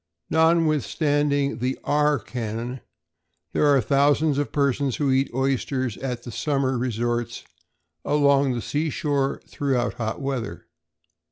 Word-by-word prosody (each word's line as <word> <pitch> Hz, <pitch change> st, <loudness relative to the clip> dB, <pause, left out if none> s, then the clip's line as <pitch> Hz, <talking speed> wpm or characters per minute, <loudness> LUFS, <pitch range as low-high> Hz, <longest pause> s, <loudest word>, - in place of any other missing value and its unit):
Notwithstanding 150 Hz, -4 st, +2 dB
the 125 Hz, +2 st, -1 dB
R 150 Hz, 0 st, +2 dB
canon, 115 Hz, +2 st, -5 dB, 0.7 s
there 150 Hz, -, +3 dB
are 140 Hz, -2 st, +5 dB
thousands 140 Hz, +4 st, +2 dB
of 145 Hz, -6 st, -2 dB
persons 140 Hz, -2 st, +1 dB
who 140 Hz, -3 st, +1 dB
eat 135 Hz, +1 st, +2 dB
oysters 130 Hz, -1 st, -1 dB
at 125 Hz, -3 st, -4 dB
the 120 Hz, -, -7 dB
summer 135 Hz, +1 st, 0 dB
resorts 120 Hz, -1 st, -2 dB, 0.6 s
along 140 Hz, -2 st, +3 dB
the 120 Hz, -, -4 dB
seashore 145 Hz, -2 st, -1 dB
throughout 130 Hz, -4 st, -1 dB
hot 110 Hz, 0 st, -2 dB
weather. 135 Hz, -6 st, -4 dB
135 Hz, 115 wpm, -24 LUFS, 125-145 Hz, 0.7 s, are